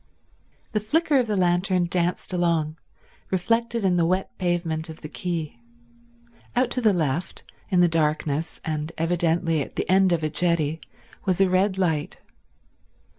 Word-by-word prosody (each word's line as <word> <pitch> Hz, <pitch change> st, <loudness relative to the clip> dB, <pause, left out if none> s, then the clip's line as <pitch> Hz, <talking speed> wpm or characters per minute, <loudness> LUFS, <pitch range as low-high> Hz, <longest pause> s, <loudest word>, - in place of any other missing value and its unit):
The 215 Hz, -, +1 dB
flicker 290 Hz, +6 st, +2 dB
of 245 Hz, -, 0 dB
the 210 Hz, -2 st, 0 dB
lantern 180 Hz, 0 st, +2 dB
danced 175 Hz, +1 st, -1 dB
along, 165 Hz, -3 st, 0 dB, 0.5 s
reflected 230 Hz, +4 st, 0 dB
in 180 Hz, -2 st, +3 dB
the 170 Hz, -, +3 dB
wet 185 Hz, +2 st, -1 dB
pavement 170 Hz, -3 st, -1 dB
of 160 Hz, -, -10 dB
the 155 Hz, -, -6 dB
quay. 160 Hz, -6 st, -4 dB, 1.0 s
Out 245 Hz, 0 st, +2 dB
to 250 Hz, -, +1 dB
the 220 Hz, -3 st, +5 dB
left, 165 Hz, -1 st, -2 dB, 0.3 s
in 180 Hz, -3 st, +3 dB
the 175 Hz, -, +6 dB
darkness 155 Hz, -1 st, 0 dB
and 155 Hz, 0 st, -3 dB
evidently 165 Hz, -1 st, +1 dB
at -, -, -6 dB
the -, -, -2 dB
end 190 Hz, 0 st, +4 dB
of 165 Hz, -2 st, +1 dB
a 155 Hz, -, +1 dB
jetty, 160 Hz, -1 st, 0 dB, 0.5 s
was 185 Hz, -1 st, +2 dB
a 195 Hz, -, +5 dB
red 190 Hz, +1 st, +2 dB
light. 160 Hz, -6 st, -1 dB
175 Hz, 155 wpm, -24 LUFS, 160-190 Hz, 1.0 s, the